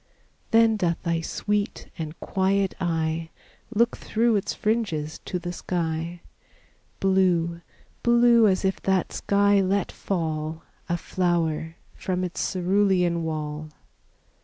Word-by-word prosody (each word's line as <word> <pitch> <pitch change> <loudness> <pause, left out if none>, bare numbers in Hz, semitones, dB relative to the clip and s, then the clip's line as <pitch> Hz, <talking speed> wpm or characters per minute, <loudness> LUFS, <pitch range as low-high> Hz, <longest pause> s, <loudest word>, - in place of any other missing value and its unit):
Then 225 -1 +5
doth 170 -4 0
thy 170 -2 0
sweet 205 +4 -2
and 160 -1 -6
quiet 195 0 +1
eye 165 -2 -1 0.4
Look 235 +1 +2
through 230 +1 +1
its 200 - 0
fringes 185 -9 -1
to 180 - -2
the 175 0 -5
sky, 170 -1 -3 0.8
Blue 180 -3 +2 0.4
blue 235 -1 +5
as 190 0 +1
if 190 - 0
that 190 -2 +1
sky 200 0 +3
let 195 +1 0
fall 160 -3 -3 0.3
A 175 - +1
flower 165 -2 -1 0.2
from 185 -1 -2
its 180 -1 -4
cerulean 185 -2 +2
wall. 155 -1 -4
180 Hz, 115 wpm, -25 LUFS, 165-200 Hz, 0.8 s, Then